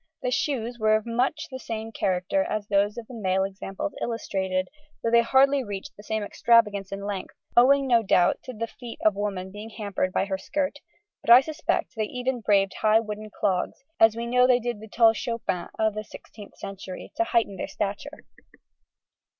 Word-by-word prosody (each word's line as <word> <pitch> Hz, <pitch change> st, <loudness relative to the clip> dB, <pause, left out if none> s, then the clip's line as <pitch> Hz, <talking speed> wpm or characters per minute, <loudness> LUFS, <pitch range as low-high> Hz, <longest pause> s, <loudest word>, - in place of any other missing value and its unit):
The 250 Hz, -, 0 dB
shoes 245 Hz, -3 st, -1 dB
were 215 Hz, 0 st, +4 dB
of 215 Hz, -, -1 dB
much 250 Hz, +7 st, 0 dB
the 260 Hz, -, -6 dB
same 225 Hz, -2 st, -5 dB
character 190 Hz, +8 st, 0 dB
as 215 Hz, -5 st, -3 dB
those 205 Hz, +1 st, +1 dB
of 235 Hz, -, -6 dB
the 250 Hz, -, -12 dB
male 190 Hz, -4 st, 0 dB
examples 195 Hz, +8 st, -5 dB
illustrated, 190 Hz, -5 st, -2 dB, 0.4 s
though 230 Hz, -, +1 dB
they 235 Hz, 0 st, +6 dB
hardly 270 Hz, +3 st, +4 dB
reached 205 Hz, +5 st, -7 dB
the -, -, -12 dB
same 220 Hz, 0 st, -2 dB
extravagance 210 Hz, -3 st, +2 dB
in 200 Hz, 0 st, -5 dB
length, 200 Hz, -2 st, -5 dB, 0.2 s
owing, 275 Hz, +3 st, +6 dB
no 240 Hz, -3 st, +4 dB
doubt, 180 Hz, -4 st, +3 dB
to 255 Hz, -, -6 dB
the 230 Hz, 0 st, -3 dB
feet 235 Hz, 0 st, -10 dB
of 215 Hz, -, +6 dB
woman 195 Hz, -2 st, -3 dB
being 210 Hz, +3 st, -8 dB
hampered 200 Hz, -4 st, -2 dB
by 190 Hz, -, +1 dB
her 190 Hz, -1 st, -3 dB
skirt; 290 Hz, +4 st, -2 dB, 0.4 s
but -, -, -7 dB
I 240 Hz, +2 st, +10 dB
suspect 310 Hz, +2 st, -2 dB
they 220 Hz, -1 st, 0 dB
even 250 Hz, +2 st, -3 dB
braved 200 Hz, -2 st, +3 dB
high 215 Hz, 0 st, +5 dB
wooden 215 Hz, -1 st, -6 dB
clogs, 190 Hz, +3 st, -1 dB, 0.2 s
as 225 Hz, 0 st, +6 dB
we 235 Hz, +1 st, -3 dB
know 250 Hz, +1 st, +4 dB
they 250 Hz, -1 st, +4 dB
did 240 Hz, -2 st, -3 dB
the 220 Hz, -, -10 dB
tall 225 Hz, +1 st, +5 dB
chopins 230 Hz, -6 st, -3 dB
of 220 Hz, -1 st, +2 dB
the 215 Hz, -, -4 dB
16th 210 Hz, -1 st, -13 dB
century, 190 Hz, -1 st, -8 dB
to 340 Hz, -, +3 dB
heighten 230 Hz, -, 0 dB
their -, -, -4 dB
stature. 210 Hz, +9 st, -5 dB
220 Hz, 190 wpm, -26 LUFS, 200-245 Hz, 0.4 s, I